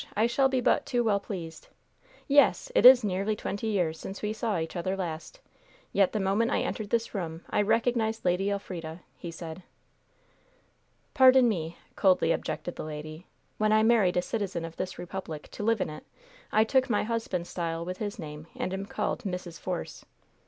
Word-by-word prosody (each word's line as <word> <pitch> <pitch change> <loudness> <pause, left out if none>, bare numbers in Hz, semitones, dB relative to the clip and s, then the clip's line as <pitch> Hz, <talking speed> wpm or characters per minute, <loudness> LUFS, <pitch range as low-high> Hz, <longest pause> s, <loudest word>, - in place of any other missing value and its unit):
I 220 - +4
shall 270 +3 +3
be 260 -1 +1
but 285 - +2
too 245 -2 +1
well 210 -3 +2
pleased. 170 -6 -7 0.6
Yes! 290 - +4
it - - +8
is 255 -2 +9
nearly 200 +2 0
twenty 210 +1 -4
years 175 -7 0
since 195 +2 -7
we 210 +1 -1
saw 220 -3 -1
each 160 +2 -4
other 185 +2 -2
last, 170 - -5 0.5
yet 195 -2 +4
the 215 - -1
moment 200 +4 +1
I - - +1
entered 215 -2 -4
this 230 +1 0
room 165 -4 -4
I - - +3
recognized 225 0 +1
Lady 180 +3 +2
Elfrida," 175 -4 -5 0.2
he 170 - -6
said. 165 +1 -8 1.5
"Pardon 260 -2 +7
me," 170 -6 -2 0.2
coldly 185 -4 +3
objected 175 - -3
the - - -4
lady. 155 +2 -7 0.3
"When 215 0 +3
I 215 0 +5
married 220 -6 +4
a 180 - +2
citizen 195 -6 -3
of 165 0 -9
this 185 - -4
republic, 175 -4 -6
to - - -7
live 225 -1 +2
in - - -1
it, 155 - -9 0.5
I 215 - +5
took 260 +3 +2
my 210 - +2
husband's 215 -6 -2
style 165 -1 -3
with 185 +1 -5
his 205 -2 -4
name, 150 0 -8
and 185 - -3
am 195 +1 -4
called - - -2
Mrs. 180 -4 -5
Force." 180 -2 -5
195 Hz, 185 wpm, -28 LUFS, 170-220 Hz, 1.5 s, is